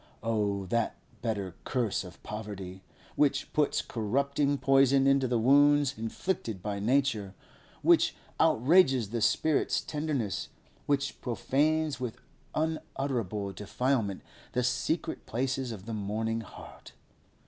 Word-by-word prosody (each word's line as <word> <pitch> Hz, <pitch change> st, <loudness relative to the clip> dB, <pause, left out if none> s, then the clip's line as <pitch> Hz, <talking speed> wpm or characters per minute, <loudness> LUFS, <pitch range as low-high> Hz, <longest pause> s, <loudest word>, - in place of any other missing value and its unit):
Oh 105 Hz, -3 st, 0 dB
that 115 Hz, +4 st, 0 dB, 0.3 s
bitter 100 Hz, -6 st, -2 dB
curse 120 Hz, -7 st, -1 dB
of 90 Hz, -2 st, -13 dB
poverty, 100 Hz, -3 st, -7 dB, 0.3 s
which 140 Hz, -2 st, +1 dB
puts 150 Hz, -2 st, +1 dB
corrupting 140 Hz, +5 st, 0 dB
poison 135 Hz, 0 st, +4 dB
into 135 Hz, -1 st, +4 dB
the 120 Hz, -1 st, +1 dB
wounds 145 Hz, +3 st, +5 dB
inflicted 110 Hz, -, -3 dB
by 100 Hz, -1 st, -2 dB
nature, 110 Hz, -4 st, +1 dB, 0.5 s
which -, -, +4 dB, 0.2 s
outrages 130 Hz, -, +4 dB
the 115 Hz, -1 st, -2 dB
spirit's 155 Hz, +6 st, +2 dB
tenderness, 145 Hz, -9 st, -2 dB, 0.4 s
which 140 Hz, -1 st, 0 dB
profanes 145 Hz, +6 st, 0 dB
with 125 Hz, -3 st, -4 dB, 0.4 s
unutterable 125 Hz, -, -2 dB
defilement 105 Hz, +1 st, -1 dB, 0.3 s
the 125 Hz, -, +1 dB
secret 125 Hz, +7 st, -1 dB
places 130 Hz, +1 st, -1 dB
of 100 Hz, -3 st, -8 dB
the 115 Hz, -, -5 dB
mourning 110 Hz, +2 st, -2 dB
heart! 110 Hz, -, -12 dB
125 Hz, 115 wpm, -29 LUFS, 105-140 Hz, 0.5 s, wounds